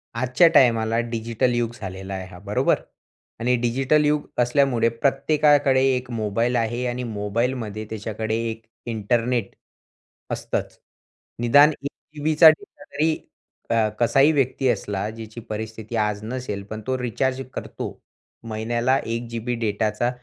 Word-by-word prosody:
आजच्या 125 +8 +4
टायमाला 115 -2 +4
डिजिटल 115 +2 0
युग 120 -1 0
झालेला 95 0 -6
आहे 95 -1 -4
हा 90 -1 -12
बरोबर. 105 +1 +1 0.6
आणि 125 +2 +2
डिजिटल 135 +5 +2
युग 150 0 +1 0.2
असल्यामुळे 120 -2 +3
प्रत्येकाकडे 140 +2 +3
1 125 0 -4
मोबाईल 115 +2 0
आहे 120 +1 0
आणि 125 +1 -3
मोबाईलमध्ये 110 0 -2
त्याच्याकडे 110 0 -3
1 110 0 -6 0.2
इंटरनेट 115 0 -1 0.8
असतंच. - - -3 0.6
निदान 145 +6 +6
1 140 - -2 0.3
जीबीचा 155 +2 +6
डेटा 195 +4 -3
तरी 160 -3 0 0.6
क 115 -2 +3
कसाही 135 +5 +5
व्यक्ती 135 -2 +1
असला, 105 -3 -1
ज्याची 110 +1 -9
परिस्थिती 110 +1 -5
आज 105 -1 0
नसेल 110 -4 -4
पण 110 0 -5
तो 130 - 0
रिचार्ज 130 +2 -1
करतो. - - -6 0.4
महिन्याला 115 +3 0
1 115 +1 -3
जीबी 115 +1 -3
डेटाचा 110 +1 0
120 Hz, 130 wpm, -23 LUFS, 110-130 Hz, 0.8 s, निदान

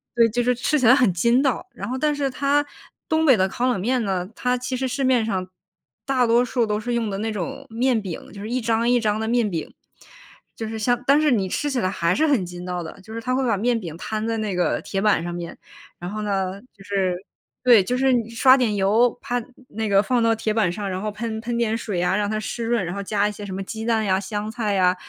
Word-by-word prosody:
对， 230 -1 +5
就 245 +3 0
是 250 0 +2
吃 295 +5 +1
起 250 - +3
来 250 - +8
很 250 -9 +3
筋 235 +9 +3
道。 270 -3 0
然 - - -6
后 255 - -2
但 300 +2 +1
是 285 -1 -1
它 285 +2 +1 0.4
东 315 0 +2
北 265 -6 +6
的 190 -1 +2
烤 245 +6 -1
冷 245 -6 +1
面 245 +5 0
呢， 185 -3 -1
它 250 0 0
其 250 +1 -3
实 260 +1 -1
市 275 +2 -2
面 255 -3 +3
上 190 -4 -2 0.6
大 260 -2 +2
多 235 +2 +4
数 245 -1 0
都 210 -1 -1
是 240 +2 -3
用 235 -2 0
的 195 - -3
那 220 +1 -2
种 185 -6 -5
面 235 +1 +1
饼， 185 -5 -7
就 200 - -9
是 215 - -6
一 255 - 0
张 230 +1 +1
一 245 0 +4
张 215 -1 0
的 220 - -2
面 230 -2 +2
饼。 165 -4 -5 0.8
就 225 - -5
是 220 0 -5
像 245 +2 +1
但 285 +2 +5
是 300 -3 +3
你 200 -5 +1
吃 295 - -1
起 265 - 0
来 185 - 0
还 170 -2 0
是 315 - +2
很 260 -11 +2
筋 175 0 -8
道 180 -1 -3
的， 160 - -9
就 220 +4 -11
是 230 - -5
他 255 +3 -1
会 265 - 0
把 225 - +2
面 235 +3 +1
饼 170 -7 -7
摊 215 +4 -3
在 230 0 -1
那 215 -3 -2
个 180 - 0
铁 195 - -3
板 205 -5 +3
上 175 0 -4
面， 170 -1 -6 0.4
然 175 +2 -6
后 215 +1 -4
呢， 195 -2 -2
就 195 - -16
是 190 -2 0 0.5
对， 240 -5 +7
就 250 +7 -1
是 265 +1 +3
你 230 -2 0
刷 260 +3 +5
点 235 -5 +1
油， 210 +5 +3
啪， 245 0 -2 0.3
那 220 0 -3
个 200 0 +4
放 245 +3 +1
到 230 0 +3
铁 220 -1 -1
板 215 -5 +2
上， 200 +2 -4
然 185 0 -3
后 215 - -2
喷 220 +1 -4
喷 235 +1 -3
点 225 -1 +1
水 205 -6 -3
啊， 180 - +2
让 205 -1 0
它 215 - -1
湿 230 +2 -4
润， 230 -4 +1
然 175 - -4
后 200 - -3
加 205 +1 +1
一 - - -4
些 205 0 -8
什 195 - -6
么 195 - -3
鸡 220 +3 -6
蛋 225 -1 +1
呀、 190 -1 +2
香 205 +2 -4
菜 220 -3 -1
呀、 185 -2 +3
220 Hz, 290 characters per minute, -23 LUFS, 195-245 Hz, 0.8 s, 来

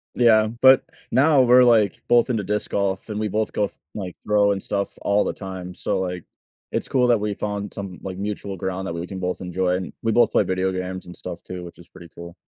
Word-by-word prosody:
Yeah, 110 -3 +5
but 125 +4 +5 0.3
now, 140 +2 +5
we're, 125 0 +6
like, 110 -5 +3
both 120 +1 +4
into 110 -4 0
disc 105 +2 -2
golf, 100 +1 -1
and 105 -1 -3
we 110 - 0
both 110 +2 -1
go 105 - +1
th - - -21 0.2
like, 95 -4 -6
throw 105 -1 +3
and 100 -1 -2
stuff 100 -1 -3
all 100 +1 +2
the - - -2
time, 95 -2 -7
so, - - -1
like, 90 -2 -3 0.5
it's - - -2
cool 125 -2 +2
that 120 -2 +4
we 105 0 -1
found 105 -1 -4
some, 95 -3 -7
like, 95 -1 -6
mutual 100 -1 -4
ground 95 +1 -3
that 85 - -3
we 85 +1 -4
can 95 0 -6
both 90 0 -3
enjoy, 90 0 0
and 90 0 -5
we 115 - 0
both 120 +2 +4
play - - +3
video 95 0 0
games 95 0 -5
and 90 0 -10
stuff - - -7
too, 90 -1 -7
which 85 - -11
is 85 - -15
pretty 85 -1 -14
cool. 85 0 -9
100 Hz, 240 wpm, -23 LUFS, 90-110 Hz, 0.5 s, we're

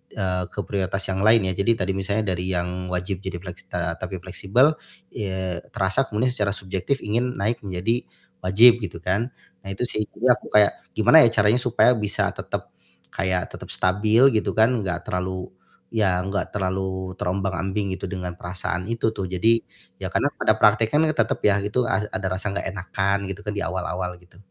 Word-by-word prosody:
eee, 90 -3 -1
ke - - -8
prioritas 95 0 -2
yang 95 - -1
lain 110 -3 +5
ya. 95 - -1
Jadi 100 +5 +2
tadi 95 - 0
misalnya 100 +1 -1
dari 90 +1 -2
yang 90 0 -2
wajib 90 +1 -2
jadi 90 -2 -4
flek 90 -2 -8
setara 85 -2 -2
tapi 95 +1 -5
fleksibel, 120 - +2 0.4
eee, 95 -5 -3 0.2
terasa 95 +8 +2
kemudian 115 +4 0
secara 105 -5 0
subjektif 95 +8 -2
ingin 120 +4 -1
naik 110 +4 0
menjadi 100 +5 -1 0.4
wajib, 115 +6 +7
gitu 85 -4 -5
kan. 100 +6 0 0.4
Nah, - - -6
itu 110 - -3
sih, 105 -2 -1
jadi 125 +3 +3
aku - - -13
kayak 105 -1 +6 0.2
gimana - - +7
ya - - +6
caranya 105 +3 +4
supaya 125 0 +4
bisa 105 -1 0
tetep - - -6 0.4
kayak 95 -2 -1
tetep - - -9
stabil, 110 +7 +4
gitu 110 -5 0
kan, 110 +2 +4
enggak 90 -4 -2
terlalu 95 -2 -3 0.4
ya 95 -5 +1
enggak 95 +2 -3
terlalu 95 -1 -2
terombang-ambing 95 +1 -2
gitu, - - -5
dengan 90 -2 -5
perasaan 90 0 -3
itu 115 -1 +1
tuh. 95 - -3
Jadi, 110 +6 +2 0.4
ya - - -2
karena - - +2
pada - - +3
praktekan 110 +8 +4
tetep 115 -8 0
ya 100 -1 +5
gitu, 120 +4 0
a - - +2
ada 105 -3 -3
rasa 95 +2 -2
enggak 100 - -2
enakan 95 +1 -1
gitu 95 +2 -7
kan, 105 -1 -3
di - - -1
awal-awal, 90 +1 -3
gitu. 90 0 -22
95 Hz, 180 wpm, -23 LUFS, 90-110 Hz, 0.4 s, wajib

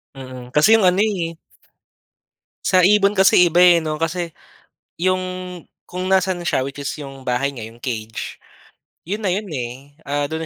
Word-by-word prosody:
Mm, 130 -2 -9
kasi 150 +8 +5
'yung 215 -5 +5
ano 185 +3 +3
eh. 175 -6 -2 1.3
Sa 185 -1 +4
ibon 200 +2 +4
kasi 190 -2 +5
iba 175 +1 +3
eh, 175 -1 +7
'no. 155 -1 -3
Kasi 170 0 -2 0.7
'yung, 185 +1 +1 0.6
kung 185 +1 -4
nasaan 185 -2 +1
na - - -4
siya, - - +1
which 140 +1 -7
is 140 - -2
'yung 135 -2 -9
bahay 125 +2 0
nya, 115 - -7
'yung 115 +2 -11
cage, 115 -3 -5 0.7
'yun 205 +5 -4
na 185 - +2
'yun 205 +1 -3
eh, 135 0 -7
ah, 145 +1 -1
'dun 160 0 -4
165 Hz, 170 wpm, -20 LUFS, 135-185 Hz, 1.3 s, eh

